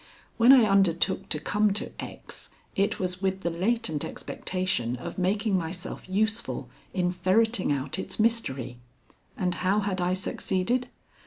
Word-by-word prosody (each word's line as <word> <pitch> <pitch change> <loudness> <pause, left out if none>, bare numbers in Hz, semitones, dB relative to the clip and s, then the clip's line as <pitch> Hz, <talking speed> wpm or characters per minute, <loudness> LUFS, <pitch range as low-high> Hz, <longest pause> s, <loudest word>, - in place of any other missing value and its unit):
When 235 +3 +7
I 250 -5 +8
undertook 195 -4 +2
to 150 - +1
come 210 +6 +2
to 210 - -2
X., - - -6 0.3
it 200 +2 +1
was 180 0 -2
with 190 0 0
the 170 - -1
latent 185 -3 0
expectation 185 -11 -2
of 125 - -6
making 200 +3 +1
myself 180 +1 -4
useful 220 +4 -1 0.2
in 180 -1 0
ferreting 195 +1 +2
out 140 +4 -2
its - - -4
mystery. 135 - 0 0.6
And 180 -1 0
how 195 +3 +2
had 195 -2 -1
I 180 +1 +1
succeeded? 190 +6 0
190 Hz, 145 wpm, -27 LUFS, 175-210 Hz, 0.6 s, I